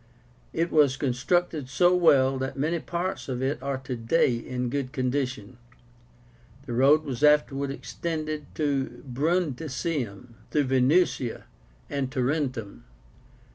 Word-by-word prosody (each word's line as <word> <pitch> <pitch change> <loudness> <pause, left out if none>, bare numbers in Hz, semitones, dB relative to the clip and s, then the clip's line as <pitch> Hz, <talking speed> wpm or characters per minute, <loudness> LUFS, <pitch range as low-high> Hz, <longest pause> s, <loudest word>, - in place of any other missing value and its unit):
It 165 +1 -1
was 145 -4 +4
constructed 145 +2 0
so 175 +6 +4
well 135 -6 +4
that 130 +1 -4
many 160 +5 0
parts 175 -1 -4
of 125 0 -2
it 135 -1 -1
are 135 0 -2
today 130 +1 +1
in 125 +1 -3
good 135 -2 -2
condition. 130 -4 -2 1.1
The 125 - -5
road 140 +6 +5
was 140 -2 -4
afterward 145 -2 +3
extended 155 +4 -4
to 135 -5 -1
Brundisium, 135 - -2
through 150 - +2
Venusia 130 -1 +2 0.4
and 135 -2 -2
Tarentum. 130 -5 -2
135 Hz, 115 wpm, -26 LUFS, 125-155 Hz, 1.1 s, road